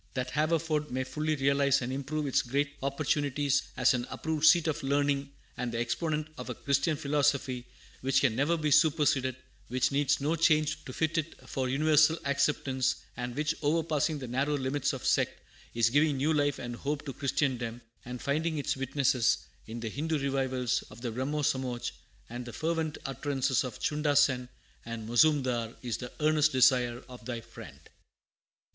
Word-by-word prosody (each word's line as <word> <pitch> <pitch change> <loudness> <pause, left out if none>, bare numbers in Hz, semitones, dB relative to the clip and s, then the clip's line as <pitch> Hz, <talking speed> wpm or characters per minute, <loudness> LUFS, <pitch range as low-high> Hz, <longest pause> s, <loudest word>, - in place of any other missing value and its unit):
That 130 -1 -2
Haverford 155 0 0
may 130 +1 -1
fully 155 +3 -2
realize 140 0 +3
and 125 +2 -3
improve 145 +3 -3
its 135 - +2
great 140 +3 -1
opportunities 140 0 0 0.2
as 125 0 +4
an 120 0 -2
approved 160 -1 0
seat 165 +1 +6
of 160 0 -1
learning 140 0 0 0.2
and 125 -1 -3
the 115 - -3
exponent 150 +6 -1
of - - -6
a - - -3
Christian 140 +2 0
philosophy 140 -4 0 0.3
which 135 +1 +2
can 130 -5 +2
never 145 +7 +2
be 155 -2 -1
superseded, 145 -4 +3 0.3
which 125 +2 +1
needs 145 +1 +2
no 150 +4 0
change 155 -2 +2
to - - -7
fit 160 +3 0
it 165 +1 -7
for 130 -2 -2
universal 155 +3 +4
acceptance, 135 -2 +1 0.2
and 125 0 -5
which, 150 +2 0
overpassing 155 0 +1
the 130 -3 -6
narrow 135 +4 0
limits 135 +1 0
of - - -6
sect, - - +1 0.4
is 115 -1 +3
giving 145 +1 +3
new 150 +4 +2
life 145 -2 +1
and 120 -1 -6
hope 145 +2 -3
to 135 - -5
Christendom, 125 -4 -1 0.2
and 125 0 -7
finding 155 +3 0
its 145 - -1
witnesses 135 -2 +2 0.3
in 115 +1 -6
the 115 - -3
Hindu 155 +6 -1
revivals 130 -3 0
of 120 - -13
the 120 -2 -3
Brahmo 140 +6 -2
Somaj 130 -4 -1 0.4
and 120 +1 -6
the 120 -1 -9
fervent 160 -1 -1
utterances 135 -1 0
of 125 - -6
Chunda 150 -1 0
Sen 130 -3 +3 0.3
and 115 -2 -6
Mozoomdar, 120 -3 +2
is 120 -3 -2
the 125 -1 -7
earnest 155 0 +3
desire 125 -2 +3
of 125 -2 -12
thy 120 -1 -3
friend. 115 - -12
140 Hz, 170 wpm, -30 LUFS, 125-150 Hz, 0.4 s, seat